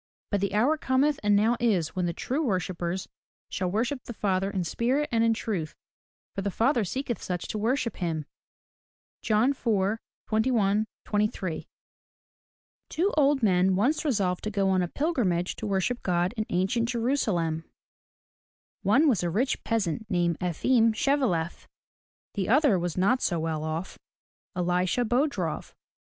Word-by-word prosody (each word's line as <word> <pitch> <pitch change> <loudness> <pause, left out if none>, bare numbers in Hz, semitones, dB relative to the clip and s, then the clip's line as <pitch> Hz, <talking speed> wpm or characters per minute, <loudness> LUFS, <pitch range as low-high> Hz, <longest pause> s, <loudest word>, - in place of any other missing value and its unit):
But 200 -2 +1
the 200 0 -1
hour 265 +9 +3
Cometh, 275 +2 +2
and 205 0 +3
now 225 +4 +3
is, 195 -10 +1
when 180 -1 0
the - - 0
true 260 - -2
worshippers 185 - -2 0.4
shall 185 -2 -2
worship 235 +7 -1
the 240 - -7
Father 195 -2 0
in 195 -3 -2
spirit 250 - 0
and 230 -1 +2
in 230 -1 +3
truth: 190 -9 -3 0.6
for 195 - -3
the 200 - -1
Father 235 +4 +2
seeketh 245 +4 -3
such 180 -1 -4
to 215 - -3
worship 230 0 0
him. 160 -4 -2 0.5
— - - -84
John 220 +5 +3
IV, 220 -5 0 0.3
21, 215 -2 +2 0.2
23. 205 -5 -1 1.2
TWO 365 +6 0
old 285 -3 +3
men 185 -2 +3
once 250 +13 +1
resolved 200 - 0
to - - 0
go 195 -2 +1
on 185 -1 +2
a 175 - 0
pilgrimage 200 - 0
to 220 - -4
worship 200 +5 0
God 180 +2 0
in 215 -2 -2
ancient 195 +6 0
Jerusalem. 215 - 0 1.2
One 225 +11 +4
was 240 -10 +3
a 175 - 0
rich 240 +10 0
peasant 220 -2 -1
named 175 -3 +1
E'fim 225 +6 +2
Shev'e 275 +2 +2
lef. 165 -1 -3 0.7
The 195 -2 -2
other 260 - +4
was 175 -1 -3
not 220 +8 +3
so 170 -3 0
well 160 -1 -2
off 160 +4 -4 0.3
— - - -21
E - - +1
li'sha 180 +6 +1
Bo'drof. 275 +6 -1
210 Hz, 160 wpm, -27 LUFS, 180-245 Hz, 1.2 s, One